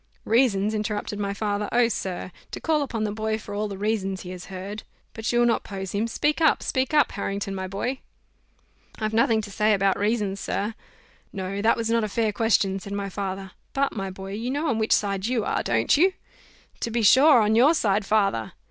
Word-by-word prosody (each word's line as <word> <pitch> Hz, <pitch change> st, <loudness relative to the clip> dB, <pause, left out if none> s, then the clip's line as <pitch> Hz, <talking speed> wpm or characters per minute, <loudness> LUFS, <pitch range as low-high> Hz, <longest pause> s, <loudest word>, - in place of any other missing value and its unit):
"Reasons!" 220 Hz, -3 st, +2 dB
interrupted 210 Hz, -1 st, -3 dB
my 200 Hz, -1 st, -1 dB
father: 205 Hz, 0 st, -2 dB
"oh! 240 Hz, -1 st, +4 dB
sir, 185 Hz, -4 st, -4 dB, 0.2 s
to -, -, -6 dB
call 315 Hz, -2 st, +1 dB
upon 235 Hz, -6 st, -2 dB
the 210 Hz, -, -1 dB
boy 220 Hz, +1 st, -1 dB
for 205 Hz, -1 st, -9 dB
all 210 Hz, +1 st, -1 dB
the 200 Hz, -2 st, -6 dB
reasons 195 Hz, -2 st, -1 dB
he 180 Hz, -, -8 dB
has 180 Hz, -1 st, -8 dB
heard 195 Hz, +3 st, -7 dB, 0.3 s
But 225 Hz, 0 st, -2 dB
you'll 240 Hz, 0 st, +3 dB
not 235 Hz, -, +2 dB
pose 195 Hz, -2 st, -6 dB
him: 210 Hz, +3 st, 0 dB
speak 295 Hz, +7 st, 0 dB
up, 315 Hz, -, +4 dB
speak 260 Hz, 0 st, 0 dB
up, 295 Hz, -3 st, +4 dB
Harrington, 200 Hz, -1 st, -3 dB
my 190 Hz, -1 st, -4 dB
boy!" 240 Hz, +8 st, -3 dB, 1.0 s
"I've 215 Hz, 0 st, -2 dB
nothing 225 Hz, 0 st, +3 dB
to 205 Hz, -, -8 dB
say 215 Hz, +1 st, +3 dB
about 195 Hz, -1 st, +1 dB
reasons, 205 Hz, -2 st, 0 dB
sir." 210 Hz, +3 st, -2 dB, 0.6 s
"No! 195 Hz, +1 st, -4 dB
that 225 Hz, +2 st, +3 dB
was 230 Hz, -1 st, -1 dB
not 230 Hz, -1 st, +2 dB
a 215 Hz, -, -2 dB
fair 220 Hz, 0 st, 0 dB
question," 200 Hz, -3 st, +2 dB
said 200 Hz, +1 st, -8 dB
my 200 Hz, -1 st, -3 dB
father; 195 Hz, -1 st, -5 dB, 0.2 s
"but, 275 Hz, 0 st, 0 dB
my 195 Hz, -2 st, -3 dB
boy, 190 Hz, +1 st, -8 dB
you 225 Hz, +4 st, -3 dB
know 290 Hz, +4 st, -1 dB
on 225 Hz, -, 0 dB
which 220 Hz, -, -1 dB
side 200 Hz, 0 st, +1 dB
you 240 Hz, -3 st, 0 dB
are, -, -, 0 dB
don't 115 Hz, -1 st, +2 dB
you?" 370 Hz, +5 st, +4 dB, 0.7 s
"To -, -, -2 dB
be 230 Hz, 0 st, -1 dB
sure 265 Hz, +6 st, +7 dB
on 215 Hz, 0 st, +3 dB
your 265 Hz, +9 st, +5 dB
side, 205 Hz, -6 st, +1 dB
father." 195 Hz, -, +1 dB
210 Hz, 210 wpm, -25 LUFS, 195-230 Hz, 1.0 s, sure